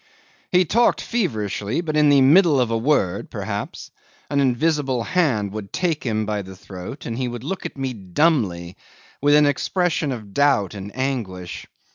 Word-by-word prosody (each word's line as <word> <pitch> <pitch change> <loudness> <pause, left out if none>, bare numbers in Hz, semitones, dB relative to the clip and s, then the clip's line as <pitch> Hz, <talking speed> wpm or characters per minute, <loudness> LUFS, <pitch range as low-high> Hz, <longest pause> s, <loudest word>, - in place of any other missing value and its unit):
'He 180 0 +4
talked 235 +8 +3
feverishly; 110 - -2
but 155 -3 -3
in 150 -1 +5
the 140 -1 +5
middle 150 +1 +5
of 120 -2 +1
a - - +1
word, 115 -8 0
perhaps, - - -5 0.4
an 140 - +1
invisible 135 -1 +1
hand 125 - +1
would 105 -1 -7
take 165 -6 -1
him 110 -3 -1
by 105 -1 -2
the 95 0 -10
throat, 95 +8 -9
and 115 +1 -4
he 130 - -1
would 120 -1 -6
look 175 +6 -3
at - - -15
me 135 -1 -2
dumbly 95 - 0 0.4
with 145 +1 +5
an 150 0 +6
expression 155 +1 0
of 105 -6 -7
doubt 135 -9 +2
and 100 0 -7
anguish. 110 -10 -4
130 Hz, 170 wpm, -22 LUFS, 105-150 Hz, 0.4 s, an